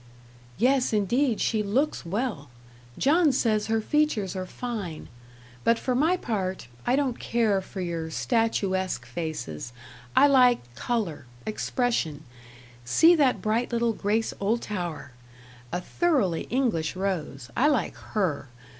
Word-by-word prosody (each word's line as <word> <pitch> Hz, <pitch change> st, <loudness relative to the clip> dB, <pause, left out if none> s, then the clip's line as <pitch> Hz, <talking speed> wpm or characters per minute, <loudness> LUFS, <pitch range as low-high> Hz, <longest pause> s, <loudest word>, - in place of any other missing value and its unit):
"Yes, 255 Hz, +2 st, +2 dB
indeed, 230 Hz, +4 st, +2 dB
she 220 Hz, -2 st, +1 dB
looks 250 Hz, +9 st, 0 dB
well. 200 Hz, -, -2 dB, 0.5 s
John 310 Hz, +2 st, +4 dB
says 220 Hz, -4 st, +1 dB
her 225 Hz, 0 st, +1 dB
features 230 Hz, -9 st, +1 dB
are 185 Hz, -1 st, -4 dB
fine; 205 Hz, -9 st, -5 dB, 0.5 s
but 230 Hz, 0 st, +4 dB
for 255 Hz, -, -1 dB
my 315 Hz, +8 st, +3 dB
part, 190 Hz, -, -3 dB, 0.2 s
I 250 Hz, -, +4 dB
don't 270 Hz, -4 st, 0 dB
care 220 Hz, -5 st, +1 dB
for 190 Hz, 0 st, -7 dB
your 165 Hz, -2 st, -3 dB
statuesque 190 Hz, -, 0 dB
faces; 125 Hz, -, -5 dB, 0.4 s
I 280 Hz, -, +7 dB
like 250 Hz, -, +4 dB
colour 180 Hz, -, -2 dB, 0.2 s
expression. 215 Hz, -, -1 dB, 0.6 s
See 320 Hz, -, +6 dB
that 285 Hz, -6 st, +2 dB
bright 225 Hz, +3 st, 0 dB
little 235 Hz, -1 st, +1 dB
Grace 215 Hz, +2 st, 0 dB
Oldtower! 195 Hz, -, -2 dB, 0.6 s
a 175 Hz, -, -1 dB
thoroughly 215 Hz, -, 0 dB
English 225 Hz, -, 0 dB
rose; 155 Hz, -10 st, -3 dB
I 270 Hz, -, +4 dB
like 290 Hz, -5 st, +1 dB
HER. 170 Hz, -10 st, -2 dB
215 Hz, 125 wpm, -26 LUFS, 180-250 Hz, 0.6 s, I